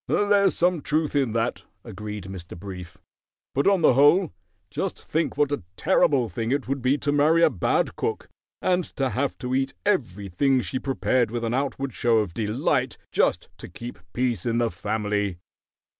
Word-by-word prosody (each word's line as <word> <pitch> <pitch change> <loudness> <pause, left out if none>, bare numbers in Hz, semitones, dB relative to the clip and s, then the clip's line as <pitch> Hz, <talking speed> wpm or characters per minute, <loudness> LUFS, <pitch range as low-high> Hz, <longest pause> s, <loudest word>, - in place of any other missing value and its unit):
"There's 205 -1 +3
some 175 -2 +2
truth 150 +1 -1
in 135 -6 +1
that," 115 +1 -1 0.2
agreed 105 -2 -7
Mr. 90 -2 -8
Brief; 90 -1 -9 0.6
"but, 140 - +1
on 195 -4 +3
the - - +6
whole, 145 +6 +5 0.4
just - - -3
think 160 -2 -2
what 145 -1 +2
a 145 - -1 0.2
terrible 130 -5 +3
thing 115 +4 -3
it 140 -2 0
would 135 0 -2
be 130 +3 +2
to 145 0 -1
marry 155 +3 +4
a - - +5
bad - - 0
cook, 440 -1 -3 0.4
and 180 -1 +2
to 135 -2 0
have 140 +2 -1
to 125 -1 -4
eat 135 +1 0
everything 125 - +1
she 130 - -3
prepared 130 -3 +1
with 120 +1 -4
an 115 0 -1
outward 135 -1 -2
show 120 -1 +2
of 105 -6 0
delight 125 - 0
just - - +1
to - - -8
keep 120 +6 -8
peace 125 -2 -1
in 115 -1 0
the 120 -1 +1
family." 105 -3 -2
130 Hz, 175 wpm, -25 LUFS, 110-145 Hz, 0.6 s, the